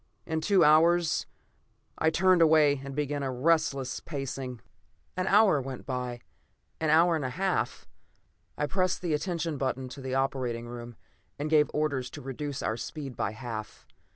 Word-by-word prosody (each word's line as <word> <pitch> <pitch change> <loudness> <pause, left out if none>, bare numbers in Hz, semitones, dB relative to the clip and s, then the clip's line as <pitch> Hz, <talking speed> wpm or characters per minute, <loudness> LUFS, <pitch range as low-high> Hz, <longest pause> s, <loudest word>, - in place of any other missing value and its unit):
In 160 -1 -2
two 195 +3 +4
hours... 165 +2 +4 0.7
I 160 - +4
turned 185 +2 +4
away 155 -4 +5
and 135 0 -7
began 145 -1 -1
a 135 -1 -2
restless 135 -1 +1
pacing. 135 -4 -5 0.6
An 185 0 -1
hour 200 -8 +5
went 130 -1 -7
by; 125 -2 -4 0.6
an 160 - 0
hour 165 +2 +5
and 155 - -2
a 130 - -1
half. 185 +8 -2 0.7
I 150 - 0
pressed 185 +3 0
the 170 -3 0
attention 165 -1 -2
button 130 -1 -2
to 135 - -9
the 130 0 -3
operating 130 -3 -1
room, 120 0 -8 0.4
and 150 +2 -3
gave 150 -1 +5
orders 140 -4 -1
to - - -8
reduce 135 +1 -5
our 110 +1 -1
speed 140 -1 -6
by 110 0 -2
half. 110 -2 -7
145 Hz, 160 wpm, -28 LUFS, 130-160 Hz, 0.7 s, away